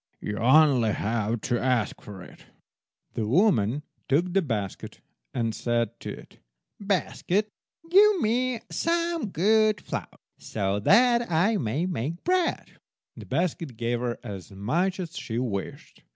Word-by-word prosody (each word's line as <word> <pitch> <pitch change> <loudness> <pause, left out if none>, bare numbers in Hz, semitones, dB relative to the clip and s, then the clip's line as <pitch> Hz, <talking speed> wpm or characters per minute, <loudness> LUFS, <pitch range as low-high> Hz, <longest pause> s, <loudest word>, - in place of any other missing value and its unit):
You 105 0 -4
only 130 -3 +5
have 110 +2 -1
to 120 +2 -1
ask 125 -4 0
for 95 -3 -10
it." - - -16 0.7
The 110 - -2
woman 145 - +2 0.3
took 170 +6 +2
the 195 - +3
basket, 105 - -4 0.3
and 115 -2 -1
said 120 0 -1
to - - -7
it— - - -10 0.4
"Basket, 200 0 -1 0.4
give 400 +3 +6
me 245 0 0
some 335 -4 0
good 215 +3 +3
flour, - - -5 0.3
so 100 -1 -2
that 235 - +4
I 190 +7 +3
may 135 - -1
make 170 -1 -3
bread." 360 -1 -1 0.4
The - - -11
basket 165 -7 -2
gave 120 +1 -1
her 120 -1 -2
as 95 -3 -8
much 170 - -1
as 175 -1 -6
she 115 - -4
wished. 110 -6 -5
150 Hz, 135 wpm, -26 LUFS, -, 0.7 s, give